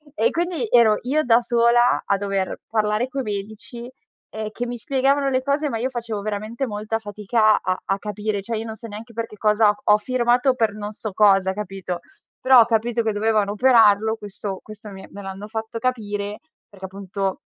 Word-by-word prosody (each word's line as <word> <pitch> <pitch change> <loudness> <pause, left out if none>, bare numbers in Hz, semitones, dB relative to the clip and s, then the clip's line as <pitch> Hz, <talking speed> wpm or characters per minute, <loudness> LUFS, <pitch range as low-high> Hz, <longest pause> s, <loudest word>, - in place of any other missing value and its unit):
e 470 - +2
quindi 340 -7 -2
ero 225 -3 +5
io 290 +5 +1
da 235 -3 +5
sola 240 0 +3
a 200 - +2
dover 195 -1 -2
parlare 215 +2 0
coi 270 +1 -3
medici, 210 +3 -6 0.4
ehm, 215 0 -5
che 240 +3 -4
mi 245 0 -5
spiegavano 275 +3 +1
le 260 -1 +1
cose 280 +3 0
ma 230 - -2
io 255 +3 -1
facevo 230 -4 -4
veramente 215 +5 -3
molta 215 +1 -3
fatica 215 +1 +1
a 185 0 -1
a 195 - -1
capire, 210 0 -3
cioè 230 +4 -4
io 220 - -4
non 220 -1 -6
so 230 +1 -10
neanche 220 +3 -9
per 230 +1 -3
che 210 - -14
cosa 210 0 +3
ho 210 - +5
firmato 245 +3 +2
per 225 -4 +1
non 210 0 -6
so 215 0 -6
cosa 195 -2 +4
hai 190 - -2
capito? 195 -3 -5 0.4
Però 260 -1 +7
ho 230 - +7
capito 235 +1 0
che 220 -1 0
dovevano 210 -1 +1
operarlo, 220 -2 +4
questo 200 -2 -6
questo 215 0 -11
mi 190 -1 -10
me 200 - -10
l'hanno 195 +1 -7
fatto 220 +1 -5
capire 210 -4 -3 0.3
perché 195 -2 -10
appunto, 195 0 -4
215 Hz, 195 wpm, -22 LUFS, 205-240 Hz, 0.4 s, Però